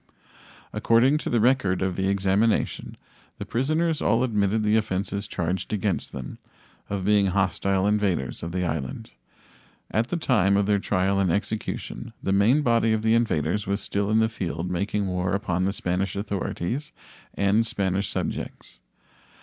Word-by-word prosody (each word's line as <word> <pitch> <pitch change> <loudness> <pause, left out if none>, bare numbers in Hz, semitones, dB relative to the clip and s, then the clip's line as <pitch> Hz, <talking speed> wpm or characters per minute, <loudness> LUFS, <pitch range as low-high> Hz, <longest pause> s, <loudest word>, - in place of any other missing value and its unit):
According 125 +6 +3
to - - -4
the 120 - +2
record 105 -6 +2
of 95 -1 -1
the 95 +1 0
examination, 100 +3 +1 0.4
the - - -6
prisoners 155 +6 0
all 115 +3 +2
admitted 105 -2 +1
the 105 +1 +3
offenses 100 -1 -1
charged 90 +2 -3
against 100 -3 -1
them, 65 -2 -7 0.5
of 100 -2 -3
being 105 -1 +4
hostile 95 0 +1
invaders 100 -10 0
of 85 - -5
the 90 +1 -1
island. 75 -5 -4 0.8
At 110 +3 +1
the 175 - -1
time 105 - +2
of 100 - +2
their 100 0 +2
trial 95 0 +1
and 95 -3 +2
execution 110 +3 -3
the 95 - 0
main 115 +10 +4
body 115 -2 +3
of 110 0 -1
the 110 0 +3
invaders 105 -4 +1
was 100 +1 0
still 100 -1 -2
in 110 - +3
the 110 0 +4
field 90 -5 -4
making 100 +3 -1
war 90 +1 -1
upon 95 -3 -1
the 100 - +1
Spanish 95 0 -2
authorities 100 - -3 0.4
and 100 +3 +3
Spanish 100 -3 -1
subjects. - - -5
100 Hz, 155 wpm, -25 LUFS, 95-110 Hz, 0.8 s, being